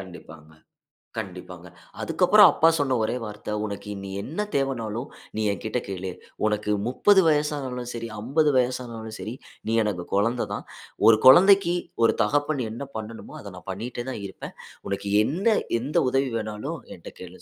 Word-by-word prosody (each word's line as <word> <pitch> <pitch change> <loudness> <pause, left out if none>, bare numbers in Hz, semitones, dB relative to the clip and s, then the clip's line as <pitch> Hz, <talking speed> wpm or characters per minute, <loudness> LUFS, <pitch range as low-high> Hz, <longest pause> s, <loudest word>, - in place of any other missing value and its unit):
கண்டிப்பாங்க. 80 -4 -12 0.6
கண்டிப்பாங்க. 90 -4 -7 0.3
அதுக்கு - - -3
அப்பறம் - - +8
அப்பா 160 - +4
சொன்ன 140 -4 +1
ஒரே 110 - -1
வார்த்தை 105 0 -6
"உனக்கு 100 0 -6 0.3
என்ன 165 - -3
தேவனாலும் 125 -2 -2 0.3
நீ - - -1
என்கிட்ட 110 +4 -3
கேளு! 95 -1 -4 0.3
உனக்கு 105 0 -1 0.2
30 195 +10 +5
வயசுனாலும் 145 -5 -1
சரி 115 -1 -5
50 150 +7 +2
வயசுனாலும் 120 -3 -2
சரி, 110 - -5 0.3
நீ 115 - +1
எனக்கு 90 -5 -3
குழந்தை 115 +5 +1
தான். - - -6 0.4
ஒரு 110 -1 +7
குழந்தைக்கு 185 +5 +7 0.3
ஒரு - - +4
தகப்பன் 145 -1 0
என்ன 120 +6 -6
பண்ணனுமோ! 110 +1 -8
அத 100 - -9
நான் 90 - -13
பண்ணிட்டே 120 +4 -5
தான் 110 -5 -6
இருப்பேன். 95 - -9 0.3
உனக்கு 100 0 -3
என்ன 195 - +2 0.2
எந்த 135 +5 -1
உதவி 135 0 +1
வேணாலும் 110 +8 -4
என்கிட்ட 85 - -10
கேளு 90 0 -11
115 Hz, 150 wpm, -25 LUFS, 105-135 Hz, 0.6 s, அப்பறம்